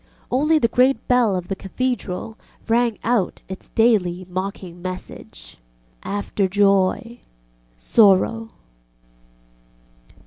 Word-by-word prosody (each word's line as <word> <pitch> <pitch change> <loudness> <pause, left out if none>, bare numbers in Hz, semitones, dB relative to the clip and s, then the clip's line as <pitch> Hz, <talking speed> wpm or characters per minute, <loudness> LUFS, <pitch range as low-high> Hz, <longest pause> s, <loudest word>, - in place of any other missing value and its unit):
Only 300 +5 +3
the 235 - +3
great 255 +4 +2
bell 245 -5 +3
of 180 -1 -4
the 195 - -3
Cathedral 220 -1 -4 0.3
rang 230 -1 +1
out 230 -5 0 0.3
daily 200 -6 +2
its 180 - -19
mocking 185 -2 -5
message, 180 - -8 0.4
ŌĆ£After 200 -1 -2
joy... 200 +4 +1 0.6
sorrow. 220 - +3
205 Hz, 95 wpm, -21 LUFS, 185-235 Hz, 0.6 s, Only